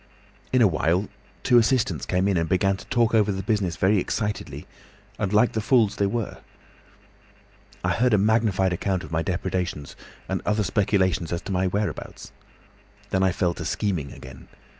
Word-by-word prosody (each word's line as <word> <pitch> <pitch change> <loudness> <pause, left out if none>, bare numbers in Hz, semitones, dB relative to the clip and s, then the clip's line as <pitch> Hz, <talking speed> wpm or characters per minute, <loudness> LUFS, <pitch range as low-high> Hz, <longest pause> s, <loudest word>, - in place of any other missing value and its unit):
"In 130 -2 +4
a - - +7
little 90 -6 +1
while 90 +6 +1 0.3
two 120 - +5
assistants 110 - 0
came 90 +1 +1
in 100 - +1
and 80 -2 0
began 95 +1 +2
to 95 - -11
talk 120 -3 +1
over 105 -2 +3
the 95 0 -4
business 100 -5 0
very 95 +5 +2
excitedly 105 +3 -3 0.5
and 100 - -1
like 105 +3 +4
the 110 - -2
fools 110 -2 +2
they 100 - +2
were. 110 +1 -3 1.4
I - - +1
heard 125 -2 +3
a - - +3
magnified 100 -3 +2
account 95 +1 -1
of - - -10
my 80 0 0
depredations, 90 -4 -3 0.3
and - - -2
other 105 0 +1
speculations 95 -5 +1
as 85 - -3
to - - -6
my 95 0 +1
whereabouts. 100 +3 -4 0.8
Then 95 - +1
I 95 -1 +3
fell 90 -1 0
to - - -7
scheming 90 -10 -2
again. 65 +1 -12
95 Hz, 180 wpm, -24 LUFS, 90-105 Hz, 1.4 s, a